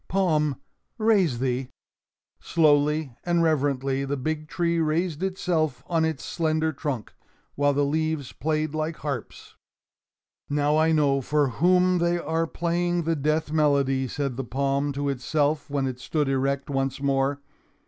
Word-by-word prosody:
Palm, 155 -7 +1 0.4
raise 205 - +3
thee!" 125 0 -1 0.7
Slowly 150 -3 +2
and 170 -1 +2
reverently 140 -3 +1
the 140 +1 -2
big 155 +3 -3
tree 170 +1 0
raised 160 +1 0
itself 180 -7 -1
on 165 -2 +1
its 160 -4 -3
slender 160 -1 0
trunk, 140 -6 -4 0.4
while 145 0 +2
the 145 +1 +2
leaves 155 -2 -1
played 155 +1 -1
like 155 +1 -2
harps. 140 -6 -6 0.9
"Now 145 +1 +2
I 160 +1 +3
know 145 -3 +3
for 145 +1 +1
whom 180 +6 +3
they 170 +1 +2
are 165 0 -1
playing 175 +1 -1
the 165 +1 0
death 155 +1 0
melody," 140 -4 +2
said 135 -1 -3
the 135 - -2
palm 140 +3 -1
to 140 +1 -2
itself 145 +3 0
when 140 -1 0
it 130 -1 -4
stood 145 +3 -1
erect 135 +1 0
once 135 -1 -1
more. 140 0 +1
150 Hz, 145 wpm, -25 LUFS, 140-160 Hz, 0.9 s, raise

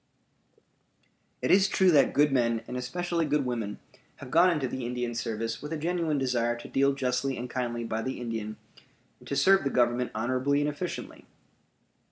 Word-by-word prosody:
It - - +2
is 195 +1 +6
true 190 -2 +3
that 145 -4 +4
good 145 0 +4
men 115 -3 +1
and 125 - -6
especially 170 +7 -2
good 145 -1 +1
women 115 -5 -3 0.4
have 125 - -11
gone 170 +4 +6
into 150 -7 0
the 130 +1 -5
Indian 120 0 -3
service 115 0 -3
with 150 +2 -7
a 160 - -2
genuine 165 -1 -1
desire 120 -3 0
to 120 - -10
deal 140 +1 +2
justly 130 0 -1
and 125 - -4
kindly 120 -2 -3
by 110 -1 -2
the 130 +3 -4
Indian 110 -3 -4 0.6
and - - -16
to 140 - -2
serve 190 +8 +5
the 140 - 0
Government 120 -1 +1
honorably 130 +5 +1
and 145 - +1
efficiently. 150 +4 -5
130 Hz, 180 wpm, -28 LUFS, 120-150 Hz, 0.6 s, is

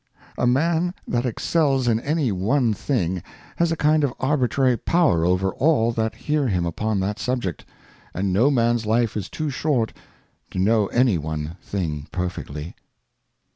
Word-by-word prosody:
A - - +1
Man 165 +7 +1
that 120 +1 0
excels 135 +1 +1
in 115 -1 +3
any 145 -1 0
one 110 +6 +1
thing 95 - -1 0.4
has 170 -1 +2
a - - +1
kind 155 0 +3
of 135 -4 0
arbitrary 130 -2 +2
Power 145 - +2
over 90 +2 +2
all 135 -6 +2
that 110 -1 -2
hear 150 -2 0
him 90 -6 0
upon 105 +5 -1
that 100 +2 -2
Subject, 120 - -2 0.5
and 95 0 -1
no 115 +9 +4
Man's 120 -4 +1
Life 115 0 +1
is 100 -3 -4
too 155 -2 -3
short 130 -5 0 0.6
to - - -8
know 105 +2 +3
any 120 -7 +2
one 75 +1 -4
thing 75 -7 -4
perfectly. 85 -4 -4
115 Hz, 155 wpm, -23 LUFS, 95-140 Hz, 0.6 s, no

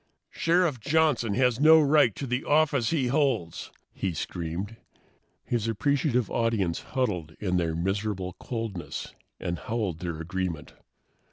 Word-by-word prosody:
"Sheriff 165 -5 +2
Johnson 140 -5 +2
has 125 -2 +2
no 160 +2 +8
right 145 -7 +4
to 140 - -4
the 125 +1 -1
office 145 -5 +2
he 150 -6 +1
holds," 125 - 0 0.2
he 95 -4 -2
screamed. 90 +8 -4 0.7
His 115 -2 -1
appreciative 125 +1 +1
audience 110 -7 0
huddled 90 - -2
in 90 -3 0
their 85 -2 0
miserable 95 +1 -2
coldness 115 -7 -5 0.3
and 85 -1 -3
howled 105 -5 -2
their 85 -2 -4
agreement. 85 -1 -4
115 Hz, 125 wpm, -27 LUFS, 90-135 Hz, 0.7 s, no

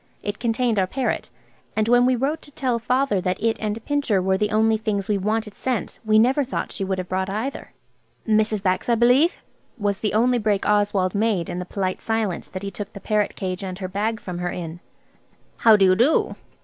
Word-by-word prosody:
It 205 0 -4
contained 235 -2 +1
our 185 - +2
parrot, 260 +5 -2 0.5
and 215 0 +1
when 245 +1 +5
we 255 - +3
wrote 280 +6 -1
to 290 - -14
tell 255 -4 -1
Father 250 -3 +1
that 180 0 -1
it 225 +1 +1
and 215 +1 -3
Pincher 285 -9 +1
were 190 +1 +1
the 210 +2 0
only 220 +1 +3
things 210 -3 -2
we 205 -2 +1
wanted 215 +1 -1
sent 255 0 -3
we 215 -1 +3
never 255 +6 +4
thought 260 - -4
she 200 - -3
would 190 0 -1
have 185 -1 -4
brought 190 +1 -1
either. 220 +8 -4 0.6
"Mrs. 215 -1 +2
Bax, 185 +4 0
I 235 - +4
believe," 250 - +4 0.4
was 205 -3 -1
the 210 -1 -1
only 245 +2 +3
break 210 -2 0
Oswald 205 -3 +2
made 205 -5 0
in 175 - -4
the 180 - -4
polite 185 0 -3
silence 225 -5 -2
that 185 +1 -7
he 200 - -4
took 205 +2 -7
the 200 - -8
parrot 210 +1 0
cage 185 0 -4
and 185 -1 -5
her 190 -1 -4
bag 210 +4 -2
from 180 -3 -6
her 175 0 -2
in. 170 -1 -6 0.8
"How 225 -2 +6
do 200 -2 +4
you 185 0 +5
do?" 250 +10 +2
215 Hz, 215 wpm, -23 LUFS, 190-235 Hz, 0.8 s, How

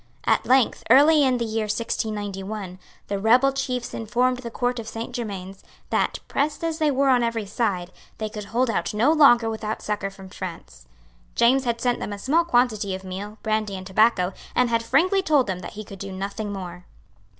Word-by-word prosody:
At - - +2
length, 260 -1 +3
early 290 +5 +7
in 260 -2 +2
the 235 - -1
year 220 0 -1
1691, 205 -3 -4 0.3
the 200 -1 -2
rebel 245 +6 +4
chiefs 255 -3 -3
informed 245 +3 0
the 245 -2 -7
Court 245 +1 -1
of 225 - -7
Saint 230 +2 -6
Germains 195 -5 -6 0.3
that, - - +1
pressed 295 +3 -1
as 325 0 -2
they 310 -1 +3
were 275 0 +2
on 250 -2 +4
every 230 -2 -1
side, 195 -4 -2 0.3
they 215 - -3
could 210 -1 -7
hold 240 +3 0
out 220 - -2
no 240 +8 +4
longer 260 -7 +6
without 220 -1 -4
succour 205 -2 -2
from 195 -1 -13
France. 165 - -9 0.5
James 255 +3 +4
had 235 -1 -1
sent 245 0 0
them 205 - -4
a - - -6
small 295 +11 +2
quantity 240 - +1
of 190 - -9
meal, 195 +3 -7
brandy 215 -2 -1
and 185 - -8
tobacco, 190 -2 +2 0.2
and 250 -1 +2
had 230 0 +2
frankly 370 - +2
told 300 -7 +3
them 190 -2 -3
that 180 - -8
he 215 - -7
could 195 -2 -11
do 195 0 -6
nothing 200 +2 -4
more. 180 -2 -7
225 Hz, 195 wpm, -24 LUFS, 200-250 Hz, 0.5 s, early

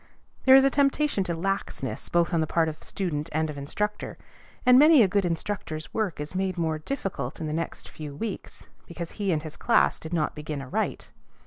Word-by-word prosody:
There 265 0 +9
is 270 - +8
a 275 - +4
temptation 280 -5 +2
to 170 - -2
laxness 195 +4 -3
both 175 +1 +2
on 165 - +3
the 155 - 0
part 165 0 +2
of 155 -1 -6
student 165 -5 -3
and 155 0 0
of - - -9
instructor; 210 +9 -3 0.5
and 250 0 +8
many 300 -3 +8
a - - +4
good 195 +1 +1
instructor's 165 -2 -3
work 210 -9 -1
is 150 +3 -5
made 185 0 -1
more 160 -2 0
difficult 155 - -4
in 160 - -3
the 150 - -3
next 165 +1 -4
few 150 -2 -8
weeks 205 +5 -6 0.2
because 170 0 -6
he 200 -3 -1
and 155 -2 0
his 155 -2 -7
class - - +3
did 160 - -8
not 160 -3 0
begin 150 -1 -5
aright. 135 -2 -3
170 Hz, 205 wpm, -26 LUFS, 155-205 Hz, 0.5 s, There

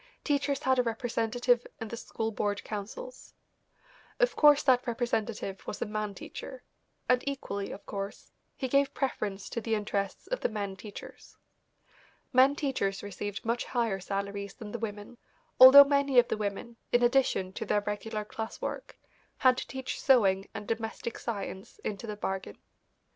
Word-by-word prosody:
Teachers 285 -2 0
had 260 -1 +3
a - - +7
representative 240 +1 0
in 225 - -5
the 235 - -5
school 225 -1 -4
board 205 -1 -2
councils. 225 - -7 0.8
Of - - +3
course 295 -1 +6
that 255 -2 +3
representative 225 -4 -2
was - - -4
a - - -1
man 210 -1 -3
teacher, - - -8 0.4
and 250 0 +3
equally 200 -8 -4
of - - -9
course, 200 0 -6 0.3
he 265 - -2
gave 275 +1 +2
preference 205 -7 -2
to 230 - -3
the 225 0 0
interests 200 -2 -2
of - - -3
the - - 0
men 200 -3 -4
teachers. 200 +1 -11 1.0
Men 260 +3 +6
teachers 260 -10 -1
received 205 +1 -5
much 235 +1 0
higher 230 -6 0
salaries 200 +1 -4
than 210 -2 -9
the 235 - -4
women, 210 +1 -6 0.4
although 260 +2 +12
many 280 -2 +1
of 245 0 +6
the - - +1
women, 210 +3 -4
in 240 0 +4
addition 240 -7 +2
to - - -4
their 205 - +1
regular 210 +1 -4
class 220 +1 -6
work, - - -5 0.4
had 255 -2 +5
to - - -4
teach 265 -1 -5
sewing 195 -8 +4
and 205 0 -6
domestic 225 0 -4
science 200 -4 -5
into 210 +2 -4
the 210 - -4
bargain. 190 - -4
225 Hz, 160 wpm, -30 LUFS, 205-255 Hz, 1.0 s, although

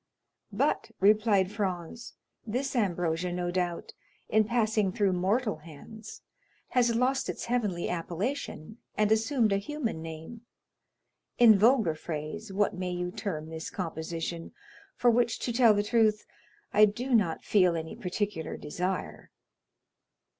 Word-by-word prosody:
"But," - - 0
replied 205 -2 +4
Franz, 200 +1 -4 0.3
"this 260 +5 -2
ambrosia, 175 -5 0
no 175 0 -2
doubt, 175 -2 -2 0.4
in 215 0 +3
passing 215 -3 +1
through 200 -2 +1
mortal 205 +5 0
hands 210 +8 -12 0.5
has 240 -2 +2
lost 260 +3 +1
its - - -4
heavenly 210 -8 -1
appellation 180 - -4 0.2
and 210 0 +2
assumed 225 -1 +2
a - - +3
human 230 - -3
name; 160 +8 -8 1.0
in 230 -3 +8
vulgar 220 -4 +4
phrase, 155 +7 -6
what 205 +1 +1
may 185 -1 -3
you 180 0 -3
term 160 -6 -5
this 160 0 -6
composition, 165 -1 -5 0.4
for 245 - +4
which, 235 0 +2
to 240 - -3
tell 230 -3 +5
the 205 - +1
truth, 215 -1 +2 0.5
I 210 +1 +7
do 240 +6 -3
not 195 -8 +2
feel 180 -4 +3
any 160 -1 -5
particular 180 -2 -3
desire?" 180 +5 -4
205 Hz, 130 wpm, -29 LUFS, 175-225 Hz, 1.0 s, in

